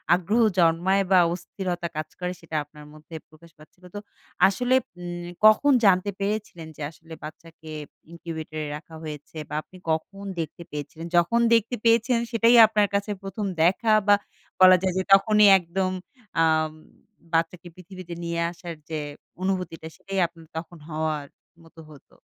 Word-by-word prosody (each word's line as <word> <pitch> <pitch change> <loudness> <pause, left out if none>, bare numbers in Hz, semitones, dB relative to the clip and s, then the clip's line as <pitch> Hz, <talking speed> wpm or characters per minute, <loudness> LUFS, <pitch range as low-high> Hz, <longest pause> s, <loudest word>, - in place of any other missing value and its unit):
আগ্রহ 205 +7 +1 0.2
জন্মায় 175 +4 +3
বা 185 - +7
অস্থিরতা 175 -1 -4
কাজ 155 -1 -4
করে, 180 0 -2
সেটা 160 -1 -8
আপনার 150 0 -15
মধ্যে 155 +2 -13
প্রকাশ 165 +2 -19
পাচ্ছিল। 155 +4 -20
তো - - -3 0.5
আসলে 245 +6 +1 0.2
উম 175 0 -6 0.2
কখন 215 +7 +6
জানতে 190 +1 +4
পেরেছিলেন 200 -5 -3
যে - - -10
আসলে, 160 +1 -14
বাচ্চাকে 160 0 -11 0.4
ইনকিউবেটর 160 -2 -7
এ - - -5
রাখা 160 +1 -14
হয়েছে 150 +1 -8
বা 150 - -5
আপনি 185 - -17
কখন 195 +5 -3 0.2
দেখতে 160 +1 -5
পেয়েছিলেন? 150 +3 -7
যখন 175 +8 +3
দেখতে 230 +2 +2
পেয়েছেন, 230 +1 +3
সেটাই 230 +1 +4
আপনার 210 -1 +2
কাছে 205 +1 -1
১ম 195 +2 -4 0.2
দেখা 205 +6 +2 0.2
বা 205 - +7 0.5
বলা 185 0 +9
যায় 185 -2 0
যে, 190 - +1
তখনই 210 +1 +6
একদম, 185 +2 -2 0.5
আম 155 -1 +2 0.6
বাচ্চাকে 165 +2 -1
পৃথিবীতে 185 -1 -10
নিয়ে 170 0 -2
আসার 170 -1 -8
যে 155 -1 -3 0.4
অনুভূতিটা, 180 -4 -3
সেটাই 195 -1 -4
আপনার 165 -1 -18
তখন 165 +1 -7
হওয়ার 155 -2 -2 0.4
মত 165 - -20
হত? 145 -3 -16
175 Hz, 150 wpm, -25 LUFS, 160-195 Hz, 0.6 s, বলা